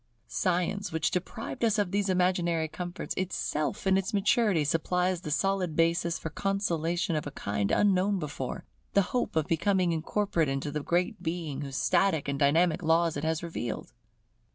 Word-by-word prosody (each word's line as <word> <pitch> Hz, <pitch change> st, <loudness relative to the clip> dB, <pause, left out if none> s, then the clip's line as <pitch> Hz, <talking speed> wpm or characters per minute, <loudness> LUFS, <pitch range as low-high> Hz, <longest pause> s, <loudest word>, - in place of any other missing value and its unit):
Science 180 Hz, +5 st, -1 dB
which 160 Hz, -1 st, 0 dB
deprived 220 Hz, +7 st, -4 dB
us 225 Hz, -1 st, +3 dB
of 205 Hz, -4 st, 0 dB
these 200 Hz, 0 st, 0 dB
imaginary 180 Hz, -3 st, +1 dB
comforts, 175 Hz, +3 st, -5 dB
itself 175 Hz, -4 st, -2 dB
in 190 Hz, 0 st, +4 dB
its 195 Hz, +3 st, -3 dB
maturity 205 Hz, -, +3 dB
supplies 180 Hz, +4 st, 0 dB
the 155 Hz, -, -6 dB
solid 180 Hz, +2 st, 0 dB
basis 170 Hz, +1 st, +2 dB
for 160 Hz, -, -6 dB
consolation 175 Hz, -3 st, 0 dB
of 150 Hz, -, -2 dB
a -, -, -5 dB
kind 100 Hz, 0 st, -1 dB
unknown 195 Hz, -, +3 dB
before; 145 Hz, -6 st, -5 dB, 0.3 s
the 200 Hz, -, +5 dB
hope 250 Hz, -, 0 dB
of 160 Hz, -2 st, +2 dB
becoming 180 Hz, +2 st, +1 dB
incorporate 165 Hz, 0 st, 0 dB
into 135 Hz, +2 st, -2 dB
the 150 Hz, 0 st, -2 dB
Great 175 Hz, +3 st, 0 dB
Being 160 Hz, -5 st, -3 dB
whose 135 Hz, -2 st, -5 dB
static 160 Hz, -1 st, +2 dB
and 140 Hz, 0 st, -2 dB
dynamic 160 Hz, +5 st, +3 dB
laws 165 Hz, 0 st, +2 dB
it 145 Hz, -, -4 dB
has 160 Hz, +1 st, -1 dB
revealed. 160 Hz, -11 st, -5 dB
170 Hz, 165 wpm, -29 LUFS, 155-190 Hz, 0.3 s, the